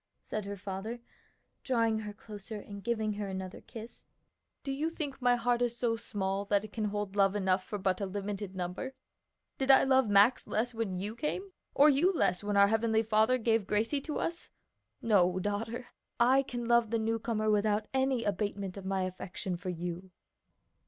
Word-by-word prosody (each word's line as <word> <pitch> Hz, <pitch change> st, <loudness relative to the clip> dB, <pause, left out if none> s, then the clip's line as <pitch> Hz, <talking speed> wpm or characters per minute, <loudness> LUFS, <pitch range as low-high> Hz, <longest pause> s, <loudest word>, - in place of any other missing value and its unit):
said 215 Hz, -1 st, -5 dB
her 200 Hz, 0 st, -5 dB
father, 200 Hz, +5 st, -5 dB, 0.6 s
drawing 230 Hz, -4 st, +1 dB
her 210 Hz, -1 st, -5 dB
closer 210 Hz, 0 st, -8 dB
and 200 Hz, -1 st, -9 dB
giving 220 Hz, -1 st, 0 dB
her 205 Hz, 0 st, -4 dB
another 190 Hz, -1 st, -6 dB
kiss. 225 Hz, +1 st, -11 dB, 0.6 s
"Do 275 Hz, -, -3 dB
you 295 Hz, +4 st, -1 dB
think 290 Hz, -5 st, -5 dB
my 245 Hz, 0 st, +4 dB
heart 240 Hz, 0 st, +1 dB
is 240 Hz, -1 st, 0 dB
so 235 Hz, -2 st, +1 dB
small 195 Hz, -3 st, -2 dB
that 200 Hz, 0 st, +2 dB
it 210 Hz, -, -13 dB
can 220 Hz, -2 st, -1 dB
hold 205 Hz, -1 st, -3 dB
love 195 Hz, -1 st, +3 dB
enough 190 Hz, -2 st, +1 dB
for 205 Hz, -, -5 dB
but 190 Hz, 0 st, 0 dB
a 200 Hz, -, -1 dB
limited 200 Hz, 0 st, -4 dB
number? 185 Hz, +9 st, -4 dB, 0.6 s
Did 265 Hz, 0 st, -1 dB
I 270 Hz, -, +8 dB
love 265 Hz, -3 st, +3 dB
Max 205 Hz, +5 st, +5 dB
less 240 Hz, +3 st, -1 dB
when 220 Hz, -5 st, -2 dB
you 205 Hz, +4 st, -4 dB
came? 370 Hz, +10 st, -3 dB, 0.2 s
or 285 Hz, -, +7 dB
you 300 Hz, +6 st, +4 dB
less 185 Hz, -, +1 dB
when 205 Hz, 0 st, 0 dB
our 200 Hz, 0 st, +7 dB
Heavenly 220 Hz, 0 st, +2 dB
Father 220 Hz, +3 st, +3 dB
gave 225 Hz, -3 st, +1 dB
Gracie 225 Hz, +8 st, +1 dB
to 300 Hz, +2 st, -4 dB
us? 335 Hz, 0 st, -3 dB, 0.5 s
No, 185 Hz, -5 st, +4 dB
daughter; 225 Hz, +5 st, -3 dB, 0.3 s
I 255 Hz, +3 st, +5 dB
can 245 Hz, -3 st, -5 dB
love 235 Hz, -1 st, +3 dB
the 230 Hz, -, +1 dB
newcomer 220 Hz, -1 st, 0 dB
without 210 Hz, 0 st, +1 dB
any 265 Hz, -2 st, +1 dB
abatement 200 Hz, -2 st, -2 dB
of 195 Hz, -, -8 dB
my 190 Hz, -1 st, 0 dB
affection 185 Hz, 0 st, -4 dB
for 180 Hz, +2 st, -5 dB
you." 175 Hz, +1 st, -5 dB
215 Hz, 185 wpm, -31 LUFS, 200-240 Hz, 0.6 s, I